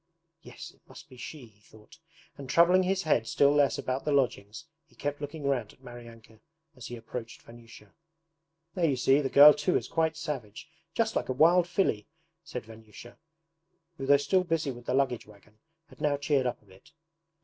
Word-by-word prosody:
'Yes, -, -, -11 dB
it -, -, -29 dB
must -, -, -14 dB
be -, -, -14 dB
SHE,' 135 Hz, +2 st, -9 dB
he 105 Hz, -3 st, -23 dB
thought, 110 Hz, +7 st, -19 dB, 0.4 s
and 135 Hz, -2 st, -10 dB
troubling 175 Hz, +5 st, +5 dB
his 190 Hz, +1 st, -1 dB
head 120 Hz, -8 st, +1 dB
still 140 Hz, +4 st, +3 dB
less 145 Hz, -1 st, +2 dB
about 130 Hz, +1 st, -3 dB
the 150 Hz, -, -2 dB
lodgings, 125 Hz, -2 st, -1 dB, 0.2 s
he -, -, -28 dB
kept 145 Hz, 0 st, -4 dB
looking 145 Hz, +1 st, -7 dB
round 130 Hz, -6 st, -2 dB
at 135 Hz, -, -27 dB
Maryanka 115 Hz, -2 st, -13 dB, 0.4 s
as 125 Hz, -, -10 dB
he 120 Hz, -, -7 dB
approached 115 Hz, 0 st, -9 dB
Vanyusha. 115 Hz, -3 st, -16 dB, 0.8 s
'There 170 Hz, -3 st, +1 dB
you 135 Hz, -, +1 dB
see, 135 Hz, +3 st, +3 dB
the 135 Hz, -, -2 dB
girl 145 Hz, +2 st, +9 dB
too 150 Hz, +5 st, 0 dB
is -, -, -5 dB
quite 160 Hz, -1 st, -1 dB
savage, 140 Hz, -8 st, -6 dB, 0.3 s
just 220 Hz, -1 st, 0 dB
like -, -, -2 dB
a -, -, 0 dB
wild 170 Hz, +6 st, +4 dB
filly!' 175 Hz, -, -1 dB, 0.4 s
said 125 Hz, -7 st, -7 dB
Vanyusha, 110 Hz, +1 st, -14 dB, 0.8 s
who 135 Hz, -, -5 dB
though 140 Hz, 0 st, +6 dB
still 145 Hz, +7 st, +1 dB
busy 165 Hz, -5 st, -1 dB
with 120 Hz, -1 st, -12 dB
the 125 Hz, -, 0 dB
luggage 135 Hz, -5 st, 0 dB
wagon 105 Hz, +1 st, -20 dB, 0.3 s
had -, -, -17 dB
now 145 Hz, -1 st, +1 dB
cheered 140 Hz, -2 st, 0 dB
up 120 Hz, -3 st, -5 dB
a -, -, -28 dB
bit. 95 Hz, +10 st, -21 dB
135 Hz, 195 wpm, -28 LUFS, 115-150 Hz, 0.8 s, girl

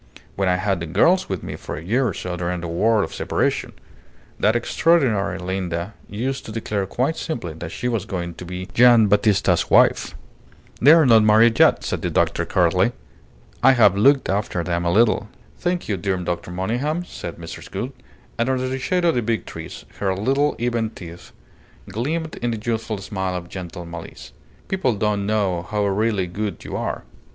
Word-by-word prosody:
When 95 Hz, -1 st, +1 dB
I 90 Hz, -, +3 dB
had 95 Hz, 0 st, 0 dB
the 85 Hz, -, -5 dB
girls 180 Hz, -, +3 dB
with 95 Hz, -3 st, -3 dB
me -, -, -5 dB
for -, -, -7 dB
a 80 Hz, -, -8 dB
year 120 Hz, +8 st, +1 dB
or 100 Hz, -, -2 dB
so 90 Hz, -1 st, -4 dB
during 90 Hz, 0 st, -3 dB
the 85 Hz, -, -4 dB
War 105 Hz, +6 st, +2 dB
of -, -, -5 dB
Separation, -, -, -1 dB, 0.7 s
that 110 Hz, +2 st, +3 dB
extraordinary 120 Hz, -, +2 dB
Linda 90 Hz, 0 st, -3 dB, 0.2 s
used 130 Hz, +6 st, -3 dB
to -, -, -6 dB
declare 105 Hz, -3 st, -2 dB
quite 130 Hz, +10 st, -1 dB
simply 115 Hz, -, -4 dB
that 80 Hz, +1 st, -7 dB
she 100 Hz, +7 st, -4 dB
was 115 Hz, -6 st, -1 dB
going 85 Hz, -2 st, -4 dB
to 85 Hz, -, -10 dB
be 90 Hz, +1 st, -6 dB
Gian' 120 Hz, -3 st, +6 dB
Battista's 105 Hz, 0 st, +2 dB
wife." -, -, +4 dB, 0.7 s
"They 145 Hz, +5 st, +8 dB
are 165 Hz, -2 st, +6 dB
not 115 Hz, -3 st, +6 dB
married 110 Hz, +2 st, +5 dB
yet," -, -, +5 dB
said -, -, -3 dB
the -, -, -1 dB
doctor, -, -, 0 dB
curtly. -, -, +2 dB, 0.7 s
"I 135 Hz, +2 st, +7 dB
have 105 Hz, -6 st, +5 dB
looked 135 Hz, +7 st, +4 dB
after 95 Hz, -3 st, -1 dB
them 85 Hz, 0 st, -2 dB
a 85 Hz, -, +2 dB
little." 110 Hz, +1 st, +3 dB, 0.3 s
"Thank 175 Hz, 0 st, -1 dB
you, 105 Hz, -, -1 dB
dear 95 Hz, +1 st, -1 dB
Dr. 90 Hz, -1 st, -4 dB
Monygham," 120 Hz, -, -2 dB
said 85 Hz, -, -7 dB
Mrs. 85 Hz, -1 st, -9 dB
Gould; -, -, -4 dB, 0.5 s
and 120 Hz, +2 st, +1 dB
under 130 Hz, -1 st, 0 dB
the 130 Hz, +1 st, -3 dB
shade 180 Hz, +6 st, 0 dB
of 165 Hz, -, +4 dB
the 120 Hz, -, 0 dB
big 115 Hz, 0 st, -1 dB
trees -, -, -9 dB
her 95 Hz, -2 st, 0 dB
little, 135 Hz, +9 st, +1 dB
even 115 Hz, -2 st, -1 dB
teeth 85 Hz, -5 st, -11 dB, 0.6 s
gleamed 155 Hz, -, -3 dB
in 120 Hz, -1 st, -1 dB
a -, -, -5 dB
youthful 110 Hz, 0 st, -3 dB
smile 95 Hz, -1 st, -3 dB
of 85 Hz, -1 st, -6 dB
gentle 90 Hz, -2 st, -7 dB
malice. 85 Hz, -7 st, -10 dB, 0.3 s
"People 135 Hz, -, 0 dB
don't 105 Hz, -1 st, -1 dB
know 100 Hz, -5 st, 0 dB
how 105 Hz, +2 st, -2 dB
really 100 Hz, 0 st, +1 dB
good 100 Hz, +4 st, -5 dB
you -, -, -6 dB
are. -, -, -3 dB
105 Hz, 190 wpm, -22 LUFS, 90-120 Hz, 0.7 s, They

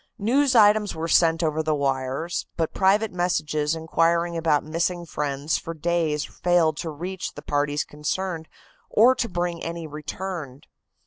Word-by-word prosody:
News 255 Hz, +5 st, +2 dB
items 210 Hz, -1 st, +5 dB
were 160 Hz, +1 st, -3 dB
sent 165 Hz, 0 st, +3 dB
over 155 Hz, 0 st, +1 dB
the 155 Hz, -1 st, 0 dB
wires, 135 Hz, +3 st, -2 dB
but 165 Hz, -2 st, -1 dB
private 200 Hz, +3 st, +3 dB
messages 155 Hz, -4 st, 0 dB
inquiring 170 Hz, +1 st, +1 dB
about 160 Hz, -3 st, +2 dB
missing 170 Hz, +3 st, -2 dB
friends 145 Hz, -1 st, -2 dB
for 165 Hz, -, -7 dB
days 160 Hz, -2 st, 0 dB
failed 175 Hz, -3 st, +1 dB
to 165 Hz, -, -4 dB
reach 180 Hz, +5 st, -5 dB
the -, -, -9 dB
parties 145 Hz, 0 st, 0 dB
concerned 160 Hz, +2 st, -4 dB, 0.4 s
or 240 Hz, +4 st, +6 dB
to 240 Hz, -3 st, -2 dB
bring 175 Hz, -1 st, -2 dB
any 165 Hz, 0 st, -5 dB
return. 150 Hz, -2 st, -6 dB
165 Hz, 145 wpm, -24 LUFS, 150-180 Hz, 0.4 s, or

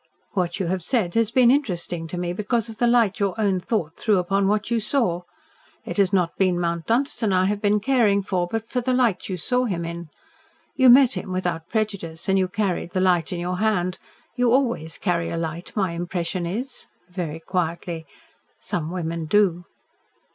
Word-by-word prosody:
"What 180 Hz, -3 st, -1 dB
you 190 Hz, -, 0 dB
have 185 Hz, +2 st, -1 dB
said 185 Hz, -2 st, 0 dB
has 225 Hz, -2 st, +2 dB
been 240 Hz, 0 st, +5 dB
interesting 180 Hz, -, -1 dB
to 175 Hz, -, -6 dB
me, 175 Hz, 0 st, -2 dB
because 215 Hz, +4 st, -1 dB
of 220 Hz, -, -9 dB
the 240 Hz, -, +2 dB
light 235 Hz, -3 st, +3 dB
your 200 Hz, +1 st, -1 dB
own 195 Hz, -3 st, +2 dB
thought 180 Hz, -4 st, -2 dB
threw 215 Hz, -3 st, +2 dB
upon 195 Hz, +2 st, +1 dB
what 210 Hz, +3 st, 0 dB
you 235 Hz, -, +2 dB
saw. 210 Hz, -6 st, 0 dB, 0.6 s
It -, -, -5 dB
has 195 Hz, -2 st, +3 dB
not 180 Hz, -4 st, +1 dB
been 185 Hz, -2 st, +2 dB
Mount 170 Hz, -1 st, -2 dB
Dunstan 235 Hz, -2 st, +1 dB
I 185 Hz, 0 st, +3 dB
have 205 Hz, +1 st, -1 dB
been 210 Hz, 0 st, +3 dB
caring 215 Hz, -4 st, +2 dB
for, 180 Hz, -2 st, -1 dB
but 225 Hz, +4 st, -3 dB
for 250 Hz, -, -1 dB
the 255 Hz, +1 st, 0 dB
light 235 Hz, -8 st, +1 dB
you 185 Hz, -, -2 dB
saw 250 Hz, +8 st, +1 dB
him 175 Hz, -7 st, -2 dB
in. 170 Hz, -1 st, -6 dB, 0.7 s
You 260 Hz, -2 st, +6 dB
met 260 Hz, +1 st, +7 dB
him 185 Hz, -, -5 dB
without 175 Hz, -3 st, -2 dB
prejudice, 200 Hz, -7 st, -3 dB
and 195 Hz, 0 st, +3 dB
you 185 Hz, -, +2 dB
carried 185 Hz, -3 st, -2 dB
the 185 Hz, -, +1 dB
light 180 Hz, -3 st, +2 dB
in 180 Hz, -, -3 dB
your 180 Hz, +1 st, -2 dB
hand. 190 Hz, -4 st, 0 dB, 0.4 s
You 245 Hz, -2 st, +2 dB
always 235 Hz, -, +1 dB
carry 170 Hz, -3 st, -1 dB
a -, -, -3 dB
light, 165 Hz, +1 st, -4 dB
my 190 Hz, -5 st, +1 dB
impression 175 Hz, +1 st, -3 dB
is," 245 Hz, +8 st, -5 dB, 0.2 s
very 175 Hz, -4 st, -5 dB
quietly. 170 Hz, -1 st, -3 dB, 0.5 s
"Some 160 Hz, -2 st, -3 dB
women 165 Hz, -2 st, -3 dB
do." 180 Hz, -2 st, +2 dB
185 Hz, 195 wpm, -23 LUFS, 175-220 Hz, 0.7 s, met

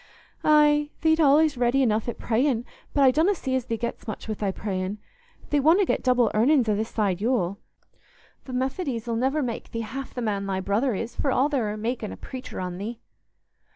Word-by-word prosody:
"Aye, 295 Hz, -1 st, +4 dB
thee't 320 Hz, 0 st, +3 dB
allays 300 Hz, -1 st, +4 dB
ready 245 Hz, +2 st, +2 dB
enough 220 Hz, -1 st, +1 dB
at 235 Hz, -, -5 dB
prayin', 240 Hz, 0 st, 0 dB, 0.3 s
but 285 Hz, -, +2 dB
I 260 Hz, -, +7 dB
donna 325 Hz, +9 st, +2 dB
see 265 Hz, -6 st, -3 dB
as 260 Hz, -2 st, -1 dB
thee 230 Hz, -2 st, -2 dB
gets 235 Hz, +1 st, -5 dB
much 215 Hz, -, -6 dB
wi' 220 Hz, -, -1 dB
thy 205 Hz, -2 st, -2 dB
prayin'. 190 Hz, 0 st, -3 dB, 0.5 s
Thee 290 Hz, -, +3 dB
wotna 330 Hz, +8 st, +4 dB
get -, -, 0 dB
double 250 Hz, -3 st, +3 dB
earnin's 250 Hz, +3 st, +3 dB
o' 210 Hz, -, +2 dB
this 220 Hz, +2 st, -2 dB
side 200 Hz, -4 st, -1 dB
Yule. 205 Hz, -5 st, 0 dB, 0.9 s
Th' -, -, -14 dB
Methodies 260 Hz, -2 st, -2 dB
'll 235 Hz, -, -1 dB
niver 270 Hz, +5 st, +1 dB
make 235 Hz, -3 st, -4 dB
thee 230 Hz, -, -4 dB
half 265 Hz, +5 st, -6 dB
the 245 Hz, -, -3 dB
man 200 Hz, -3 st, -1 dB
thy 190 Hz, -1 st, -1 dB
brother 210 Hz, +6 st, 0 dB
is, 230 Hz, +4 st, -5 dB
for 275 Hz, -, 0 dB
all 270 Hz, +3 st, +2 dB
they're 255 Hz, -8 st, 0 dB
a -, -, -6 dB
makin' 225 Hz, 0 st, -3 dB
a -, -, -8 dB
preacher 260 Hz, -1 st, -8 dB
on 180 Hz, -1 st, -4 dB
thee." 225 Hz, +3 st, -5 dB
240 Hz, 210 wpm, -25 LUFS, 215-275 Hz, 0.9 s, I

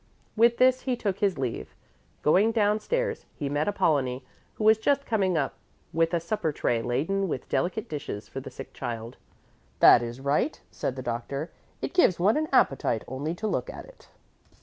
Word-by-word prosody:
With 235 Hz, +1 st, +4 dB
this 255 Hz, 0 st, +4 dB
he 255 Hz, -2 st, -1 dB
took 200 Hz, -5 st, -2 dB
his 200 Hz, -3 st, +1 dB
leave. 125 Hz, -4 st, -4 dB, 0.5 s
Going 195 Hz, +9 st, +4 dB
downstairs, 220 Hz, -, 0 dB
he 145 Hz, -3 st, -3 dB
met 145 Hz, +2 st, 0 dB
Apollonie, 135 Hz, -10 st, +1 dB, 0.3 s
who -, -, -4 dB
was 220 Hz, 0 st, +6 dB
just 280 Hz, +4 st, +1 dB
coming 190 Hz, -6 st, +1 dB
up 140 Hz, -3 st, 0 dB, 0.4 s
with 165 Hz, 0 st, +2 dB
a -, -, +2 dB
supper 170 Hz, 0 st, -2 dB
tray 120 Hz, -5 st, 0 dB
laden 155 Hz, +12 st, 0 dB
with 135 Hz, -6 st, -4 dB
delicate 190 Hz, +5 st, -1 dB
dishes 145 Hz, -9 st, -6 dB
for -, -, -6 dB
the -, -, -8 dB
sick -, -, -10 dB
child. 115 Hz, 0 st, -6 dB, 0.6 s
"That -, -, +8 dB
is 120 Hz, +1 st, -5 dB
right," 140 Hz, -, 0 dB
said 130 Hz, -, -3 dB
the 130 Hz, -, -6 dB
doctor; 130 Hz, +6 st, -4 dB, 0.3 s
"it -, -, -3 dB
gives 345 Hz, -, +4 dB
one 200 Hz, +5 st, +4 dB
an 310 Hz, 0 st, 0 dB
appetite 135 Hz, -, +2 dB
only 145 Hz, +6 st, -3 dB
to 215 Hz, -, -6 dB
look -, -, -2 dB
at -, -, -8 dB
it." -, -, -18 dB
170 Hz, 180 wpm, -27 LUFS, 135-220 Hz, 0.6 s, That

